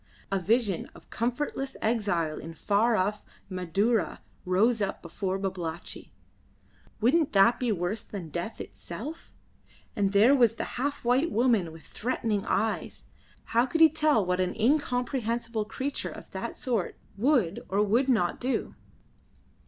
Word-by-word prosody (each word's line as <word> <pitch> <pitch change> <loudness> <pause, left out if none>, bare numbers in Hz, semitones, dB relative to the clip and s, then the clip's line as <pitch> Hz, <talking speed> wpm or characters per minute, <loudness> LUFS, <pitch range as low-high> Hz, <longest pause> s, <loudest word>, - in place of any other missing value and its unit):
A 195 - +1
vision 205 0 +1
of - - -17
comfortless 265 +3 -2
exile 200 -9 0
in 165 +1 -8
far 215 +7 +2
off 205 +2 0 0.3
Madura 195 +5 0 0.3
rose 215 +5 +3
up 195 -1 -2
before 185 +3 -3
Babalatchi. 180 -4 -5 0.9
Wouldn't 275 +7 +3
that 200 +4 +5
be 245 -3 +1
worse 195 +3 -1
than 185 -6 -7
death 175 +8 -4
itself? 285 - -7 0.6
And 200 -2 +1
there 210 +7 +6
was 235 -4 +4
that - - -3 0.2
half 285 -2 -2
white 260 +7 +3
woman 225 -8 +2
with 160 0 -13
threatening 220 -3 -2
eyes. 220 0 -1 0.4
How 235 +3 +2
could 325 - -1
he 320 -1 +9
tell 300 -9 +2
what 180 0 0
an 185 -1 0
incomprehensible 240 -3 0
creature 270 +6 -3
of - - -11
that - - -5
sort 240 -9 -2 0.2
would 230 - +2
or 200 +2 +2
would 235 +6 +2
not 195 -9 +2
do? 255 +1 -1
220 Hz, 140 wpm, -28 LUFS, 190-250 Hz, 0.9 s, he